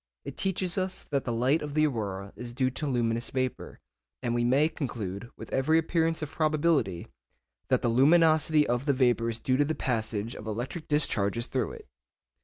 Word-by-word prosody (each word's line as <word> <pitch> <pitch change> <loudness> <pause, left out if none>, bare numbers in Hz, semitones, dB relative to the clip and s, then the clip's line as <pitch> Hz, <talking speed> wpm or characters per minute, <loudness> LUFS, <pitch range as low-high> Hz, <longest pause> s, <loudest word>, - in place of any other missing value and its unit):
It - - -6
teaches 190 -1 -1
us 185 0 -3
that 140 -2 0
the 120 - -1
light 125 +7 +2
of 150 -1 -5
the 155 0 +4
aurora 100 -7 -3
is 120 -1 -8
due 130 0 +1
to 150 +3 -3
luminous 120 -2 0
vapour, 130 -1 -3 0.4
and 120 -1 0
we 120 0 +1
may 135 +5 +4
conclude, 115 - -5
with - - -9
every 155 +5 +3
appearance 165 0 +1
of 150 - -5
probability, 155 - +1 0.6
that - - +1
the - - +2
luminosity 155 +4 +4
of 120 +2 0
the 140 - +4
vapour 120 -3 +2
is 115 - -2
due 130 +2 0
to 145 - +3
the 160 +2 -1
passage 110 -3 -2
of 105 - -9
electric 125 +9 -4
discharges 115 -7 +1
through 130 -1 -2
it. - - -12
130 Hz, 190 wpm, -28 LUFS, 115-155 Hz, 0.6 s, the